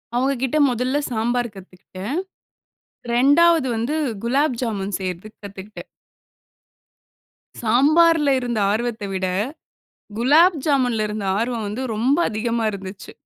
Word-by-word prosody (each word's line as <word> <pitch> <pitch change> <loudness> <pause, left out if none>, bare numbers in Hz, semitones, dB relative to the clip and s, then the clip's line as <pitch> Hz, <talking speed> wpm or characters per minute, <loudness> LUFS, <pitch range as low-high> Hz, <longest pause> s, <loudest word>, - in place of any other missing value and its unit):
அவுங்க 265 +3 +1
கிட்ட 265 +3 0
மொதல்ல 250 +3 -1
சாம்பார் 240 +1 -1
கத்துக்கிட்டேன். 190 - -8 1.0
2வது 285 +5 +4
வந்து 235 +7 -2 0.3
குலாப் 265 +2 +1
ஜாமுன் 200 -5 -2
செய்றதுக்கு 190 +3 -6
கத்துக்கிட்டேன். 200 +1 -10 1.8
சாம்பார்ல 295 +6 +4
இருந்த 240 -3 -2
ஆர்வத்த 225 0 -2
விட, 190 0 -1 0.9
குலாப் 310 +8 +5
ஜாமுன்ல 250 -7 +1
இருந்த 210 -1 -4
ஆர்வம் 230 -1 -2
வந்து 215 +6 -4
ரொம்ப 245 +7 +2
அதிகமா 230 +1 -2
இருந்துச்சு. 195 0 -9
235 Hz, 105 wpm, -21 LUFS, 210-270 Hz, 1.8 s, குலாப்